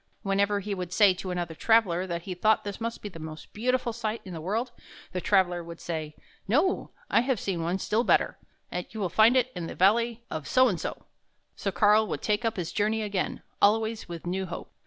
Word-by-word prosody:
Whenever 200 +1 +1
he 205 +1 -3
would 180 -2 -4
say 200 0 +5
to 185 +1 -6
another 175 -2 -3
traveler 190 -2 +3
that 170 -1 -3
he 185 - -4
thought 215 +5 +2
this 205 +1 -6
must 230 0 -4
be 205 - -4
the 165 - -11
most 155 0 -9
beautiful 245 +1 0
sight 225 -1 -3
in 185 - -7
the 160 - -6
world, 225 +9 -1 0.4
the 180 - -3
traveler 180 -3 +2
would 170 0 -9
say: 155 -3 -4 0.2
" - - -32
No. 375 +5 +1 0.2
I - - +5
have 250 -3 0
seen 185 -4 -2
one 170 +3 0
still 215 +4 0
better; - - +2 0.5
you 220 - -8
will 190 -3 0
find 220 +8 +5
it 255 0 +2
in 170 -2 -4
the - - -7
Valley 230 +4 +3
of 155 -2 -4
So 255 0 +5
and 185 -8 -1
so." - - -5 0.5
So 195 - -2
Karl 210 +4 +4
would - - -4
take 210 +2 +1
up 225 -3 -1
his 175 -3 -3
journey 215 +1 +1
again, 200 -3 -2 0.2
always 220 0 +2
with 170 -1 -7
new 185 +2 -2
hope. 170 - -7
200 Hz, 220 wpm, -28 LUFS, 175-225 Hz, 0.5 s, say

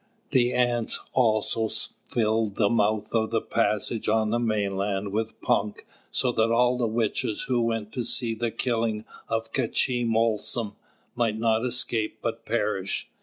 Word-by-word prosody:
The 125 -1 +4
Ants 120 -2 +1
had - - -14
also 110 -2 +2 0.4
filled 110 -2 +1
the 100 -2 +2
mouth 110 -2 +1
of 110 -1 +2
the 115 - +1
passage 110 0 0
on 110 0 +2
the 120 - +2
mainland 100 -3 -1
with 110 +2 -2
punk, 105 0 0 0.2
so 130 -2 +1
that 115 -1 +2
all 125 +2 +3
the 120 - +2
witches 110 -1 -1
who 125 -2 +1
went 115 -2 -1
to 125 - -2
see 115 0 +1
the 115 +1 -1
killing 115 -2 -1 0.2
of 115 0 -2
K'chī 120 -1 +1
Molsom 115 -1 0 0.4
might 115 -3 0
not 110 0 +2
escape 120 -3 -1
but 115 0 -3
perish. 105 -4 -1
115 Hz, 155 wpm, -26 LUFS, 110-120 Hz, 0.4 s, The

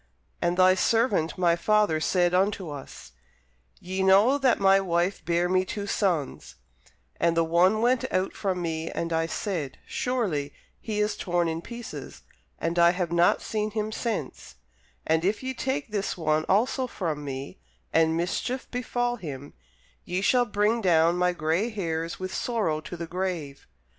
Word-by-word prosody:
And 175 +1 +1
thy 185 0 +6
servant 205 -4 +1
my 175 -2 +3
father 210 -3 +2
said 175 +2 +2
unto 190 -2 +1
us, 140 - -10 0.7
Ye 190 +2 -3
know 200 +9 +5
that 260 -3 +3
my 195 0 +5
wife 175 0 0
bare 170 +2 +1
me 185 +1 +2
two 200 +2 -5
sons: 180 -8 -1 0.6
and 170 -1 +2
the 165 - +4
one 180 +6 +3
went 250 +1 +1
out 185 +1 0
from 185 -3 -2
me, 165 -1 -3
and 170 0 -3
I 165 0 +1
said, 165 -7 -3
Surely 225 - -2 0.3
he 215 -2 -3
is 210 0 +1
torn 175 -2 0
in 165 0 -3
pieces; 235 +4 -9 0.3
and 165 +1 -1
I 170 0 +6
have 180 -2 -2
not 170 0 +3
seen 215 -1 -2
him 215 0 -3
since: 180 - -4 0.5
and 160 +1 +2
if 205 +7 0
ye 260 0 -2
take 265 +1 -2
this 200 -3 -2
one 155 -2 +1
also 250 +6 +2
from 160 -10 -3
me, 135 -7 -6 0.3
and 160 0 +3
mischief 185 +9 -2
befall 245 0 -1
him, 145 - -8 0.5
ye 180 +1 -2
shall 245 +4 +3
bring 220 +1 +1
down 170 -3 +4
my 180 0 +2
gray 170 +6 0
hairs 165 -6 -3
with 185 0 -5
sorrow 205 -11 -1
to 175 - -8
the 170 - -4
grave. 170 -5 -4
180 Hz, 165 wpm, -26 LUFS, 165-215 Hz, 0.7 s, thy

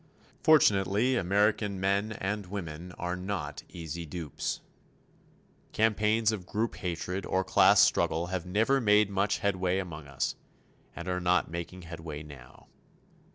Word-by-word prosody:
Fortunately, 110 -4 +4
American 105 0 +1
men 100 +3 +1
and 100 -1 -3
women 90 -3 -6
are 90 0 -3
not 90 -6 -4
easy 85 0 -6
dupes. 80 -2 -4 1.1
Campaigns 110 0 +2
of 95 -5 -5
group 110 +2 -2
hatred 90 +1 -3
or 95 +1 0
class - - +5
struggle 80 +2 +2
have 90 -2 -1
never 110 +10 +2
made 105 -2 +4
much 100 +1 +1
headway 95 -2 0
among 80 -6 -5
us, 70 -1 -2 0.6
and 85 - -7
are 90 0 -1
not 90 -1 +2
making 85 +2 -6
headway 80 -2 -7
now. 70 -5 -14
95 Hz, 130 wpm, -29 LUFS, 85-105 Hz, 1.1 s, class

